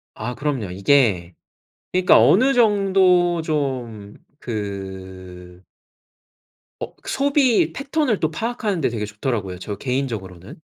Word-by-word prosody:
아 125 +3 -5
그럼요. 135 -10 -2
이게 95 -4 +2 0.6
그러니까 185 0 +5
어느 260 +8 +5
정도 190 -6 +3
좀 130 -9 -3 0.3
그 95 -4 -7 1.2
어 - - -6
소비 270 - +2
패턴을 275 - -1
또 160 0 0
파악하는 215 -2 -2
데 - - +1
되게 110 -3 -3
좋더라고요, 105 -3 -4
저 105 +2 -5
개인적으로는. 115 - -4
130 Hz, 235 characters per minute, -21 LUFS, -, 1.2 s, 그러니까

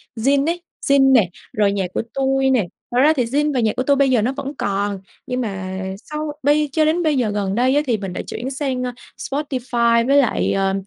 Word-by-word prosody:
Zing 275 +5 +2
ấy, 340 +2 -1 0.3
Zing 275 -1 +5
nè, 225 -9 +4 0.2
rồi 205 -1 +2
Nhaccuatui 265 +8 -1
nè. 250 -7 +2 0.3
Thật 240 - -1
ra 305 +3 +5
thì 265 -5 0
Zing 290 +5 0
và 260 - +1
Nhaccuatui 255 +5 +1
bây 275 -1 +3
giờ 245 -4 +3
nó 245 +5 0
vẫn 280 0 -4
còn, 200 0 -1 0.3
nhưng 250 0 -2
mà 190 -4 -4 0.2
sau 300 +6 -5
bây 295 +1 +3
cho 310 +2 +2
đến 325 +3 +1
bây 305 -3 +2
giờ 240 -4 +1
gần 200 -2 -2
đây 255 +3 +2
á, 295 - +4
thì 240 -5 +1
mình 195 -3 -6
đã - - -4
chuyển 250 +3 -5
sang, 265 -2 -2
ơ, 250 - -2 0.3
Spotify 245 -5 0
với 280 +1 +4
lại, 275 -4 +2
ờ, 195 0 +1
255 Hz, 215 wpm, -20 LUFS, 215-280 Hz, 0.3 s, Zing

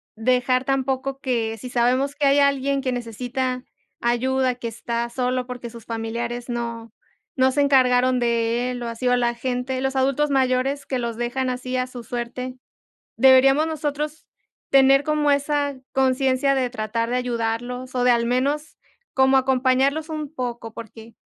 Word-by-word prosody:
dejar 250 +2 +1
tampoco 270 0 -1
que 230 -5 -1
si 250 +4 -8
sabemos 255 +4 +1
que 290 - 0
hay 280 +1 +4
alguien 280 0 +2
que 260 -1 -1
necesita 250 +2 -3 0.4
ayuda, 255 +2 +1
que 240 -1 -6
está 235 +1 -3
solo 250 0 -1
porque 245 -1 -6
sus 230 -1 -12
familiares 235 +2 -4
no 235 -1 -4 0.4
no 260 0 +3
se 285 - +1
encargaron 255 -2 +4
de 235 +1 0
él, 245 -1 -5
o 240 - -4
así, 230 +2 -3
o - - +3
a 250 - +4
la 240 -1 +1
gente, 250 +2 -2
los 270 +1 -1
adultos 275 +2 +1
mayores, 265 +1 +1
que 260 - -1
los 235 -2 -3
dejan 255 +2 -1
así 255 0 -3
a 255 - 0
su 250 -1 -9
suerte, 245 +2 -5 0.6
deberíamos 270 +4 +5
nosotros 300 0 -4 0.4
tener 275 +1 +5
como 300 -1 +1
esa 285 0 0 0.2
conciencia 265 +1 +2
de 255 -1 +1
tratar 230 -1 -2
de 250 - 0
ayudarlos 245 +1 -3
o 250 - 0
de 250 - +4
al 235 -1 +2
menos 280 +5 -1 0.4
como 265 0 +4
acompañarlos 265 +3 +2
un 305 -1 -5
poco, 240 -4 -5
porque 225 0 -11
255 Hz, 165 wpm, -23 LUFS, 240-270 Hz, 0.6 s, deberíamos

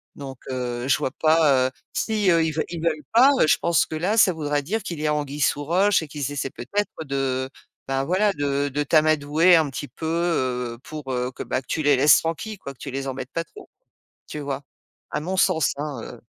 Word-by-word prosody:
donc 135 -2 -8
heu, 125 -1 -3
je - - +4
vois - - -1
pas, 155 -5 +3
heu, - - -23 0.2
si 215 -3 0
eux 165 -2 +4
ils 160 - -1 0.2
ils 170 -2 -5
veulent 155 -2 0
pas, 255 +5 +7
heu, - - +5
je - - +4
pense 170 -1 +2
que - - -5
là 180 +7 0
ça 210 -4 +6
voudrait 145 -2 -1
dire 210 +8 -2
qu'il 170 -5 -5
y 155 - 0
a 150 - +2
anguille 145 0 -4
sous 145 +1 +1
roche 185 +3 +3
et - - -8
qu'ils 145 -1 -4
essaient 140 -1 -3
peut-être 205 - -3
de, 135 -2 -2 0.4
bah 135 0 0
voilà 190 +7 +2
de 145 -1 -1
de 145 +2 -1
t'amadouer 155 +3 +4
un 160 -2 +3
petit 135 +3 -5
peu, - - -9
heu, 130 -8 -1
pour, 150 -4 -7
heu, 125 0 -2
que - - -9
bah, 130 - -2
que - - -34
tu 160 - -1
les 145 -1 +4
laisses 140 +3 +6
tranquilles 180 +6 -4
quoi, 140 -6 -8
que - - -29
tu 135 - -6
les 135 +1 -4
embêtes 130 0 -5
pas 165 - -1
trop, 415 - -15 0.6
tu 150 - -6
vois? 140 -1 -4 0.5
A - - -1
mon 180 +5 -3
sens 165 -6 +2
hein, 145 -4 -4
heu 120 - -10
150 Hz, 230 wpm, -23 LUFS, 135-165 Hz, 0.6 s, pas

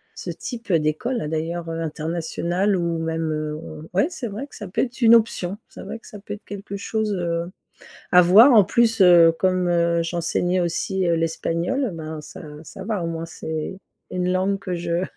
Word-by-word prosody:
ce - - -5
type 230 -6 -5
d'écoles, 160 +7 0
d'ailleurs 165 +2 -3
internationale 165 +4 -1
ou 170 -2 -1
même, 165 0 -2
heu, 155 0 -3 0.3
ouais 195 +10 +3
c'est 275 -9 -5
vrai 220 +7 -6
que - - -15
ça 205 - -7
peut 180 - -1
être 260 +1 -4
une 230 -1 +7
option. 205 -4 +1
C'est - - -10
vrai - - -7
que - - -17
ça 210 - -10
peut 205 +1 -7
être 205 - -10
quelque 200 0 -7
chose, 215 0 -2
heu, 170 -1 -2 0.6
à 180 - +8
voir. 210 +10 +7
En 215 -3 +8
plus, 225 +3 +2
heu, 170 -3 +7
comme, 185 0 +2
heu, 170 -1 +2
j'enseignais 175 +2 0
aussi, 180 +2 -1
heu, 170 - +3
l'espagnol, 165 - -1
ben 155 -1 -6
ça - - -11 0.2
ça 165 - -10
va 205 -3 -2
au - - -2
moins 165 0 -4
c'est 160 +2 -5 0.3
une 180 0 0
langue 190 +2 0
que 185 - -4
je 170 +1 -1
175 Hz, 190 wpm, -23 LUFS, 165-205 Hz, 0.6 s, à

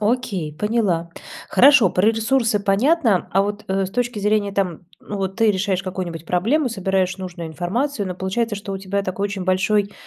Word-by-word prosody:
окей, 205 -8 -1
поняла. 195 -2 0 0.4
Хорошо, 250 -1 +6
про 185 +4 +1
ресурсы 225 -1 +1
понятно, 220 - +2
а 195 +1 +4
вот 205 +1 -4
э 190 0 0
с - - -9
точки 240 0 -2
зрения 205 0 +1
там, 185 -5 -2 0.2
ну, 205 - -6
вот 190 0 -3
ты 225 -2 +4
решаешь 190 -1 -1
какую-нибудь 180 -4 -5
проблему, 245 - +1
собираешь 190 -3 -1
нужную 175 -3 -7
информацию, 205 - -2
но 180 - -4
получается, 210 +5 -2
что 200 0 -6
у 195 - -4
тебя 195 +1 -2
такой 195 +1 -3
очень 200 -2 -3
большой 200 +2 +1
195 Hz, 180 wpm, -21 LUFS, 185-220 Hz, 0.4 s, Хорошо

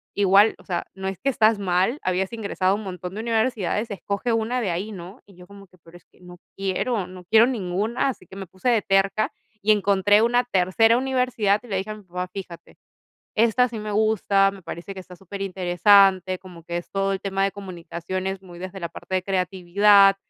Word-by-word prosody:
igual, 200 +2 +5
o - - -18
sea, 175 -3 -3
no 190 0 -5
es 195 -2 -4
que 275 - 0
estás 220 -4 +3
mal, 190 +7 +1
habías 185 +3 -1
ingresado 200 -4 -1
a - - +2
un 210 - -5
montón 180 -2 -7
de 215 - -5
universidades, 225 -2 -1
escoge 200 +4 -2
una 225 +3 0
de 205 -7 -1
ahí, 195 +6 -3
¿no?". 190 +4 -10
Y 200 - -18
yo 180 0 -14
como 200 +1 -14
que: 185 - -24
"Pero 170 +1 -16
es 175 - -24
que - - -29
no 180 0 -13 0.2
quiero, 195 +2 -1
no 180 0 -11
quiero 220 +5 +6
ninguna". 215 +1 -1
Así 235 -8 -7
que 190 - -14
me 195 -1 -7
puse 190 +8 -2
de 230 -3 +3
terca 195 +2 +1 0.3
y 215 +1 +3
encontré 205 0 +3
una 245 +1 +2
tercera 225 +2 +3
universidad, 250 -6 +1
y - - -13
le 195 -4 -2
dije 195 +3 -4
a - - -5
mi 210 - -14
papá: 180 0 -5
"Fíjate, 180 -4 -9 0.6
esta 230 +3 +4
sí 230 -2 -7
me 210 0 -5
gusta. 205 -2 +2
Me 195 -1 -12
parece 175 +3 -7
que 190 - -8
está 180 0 -13
superinteresante, 190 0 +2
como 180 -3 -13
que 170 +1 -4
es 175 - -7
todo 195 0 0
el 195 - -3
tema 195 -1 -1
de 195 - +1
comunicaciones 185 0 -5
muy 175 -2 -13
desde 185 +1 -7
la 170 - -3
parte 185 - -6
de 185 - 0
creatividad, 195 +2 +4
195 Hz, 215 wpm, -23 LUFS, 185-215 Hz, 0.6 s, quiero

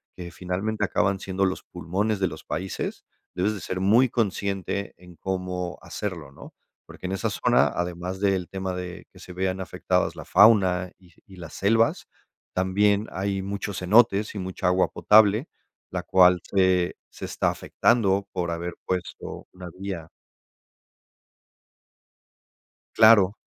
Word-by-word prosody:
que 85 -1 -8
finalmente, 95 +5 -2
acaban 100 0 0
siendo 95 +1 -2
los 95 0 -2
pulmones 95 +5 -2
de 95 - +3
los 80 -1 -10
países, 95 +1 -4 0.3
debes 100 +4 0
de 100 - -7
ser 90 +3 -4
muy 115 +7 +4
consciente 100 -3 -2
en 90 0 -15
cómo 90 -1 -4
hacerlo, 85 -9 -6
¿no?, - - -13 0.3
porque - - -12
en 95 - -2
esa 95 - -1
zona, - - +3
además 90 +1 -4
del 95 -3 0
tema 95 -1 -4
de 90 -1 -7
que - - -16
se - - -11
vean 95 +1 -2
afectadas 95 - -1
la - - -8
fauna 95 -3 +4
y 90 -3 -22
y 95 - -15
las 85 -3 -9
selvas, 115 +3 +1 0.5
también 100 +3 +2
hay 95 +1 -2
muchos 100 0 -4
cenotes 105 +2 +3
y - - -3
mucha 95 -1 -3
agua 90 +1 +3
potable, 110 +5 +4 0.4
la - - -3
cual 90 -1 +5
se 95 -2 +1
se - - -12
está - - 0
afectando 100 -4 +1
por 90 -2 -2
haber 85 +1 -4
puesto 90 -1 -5
una 90 -1 -9
vía. 95 -5 -5 2.9
Claro, 110 -3 +7
95 Hz, 145 wpm, -25 LUFS, 90-100 Hz, 2.9 s, Claro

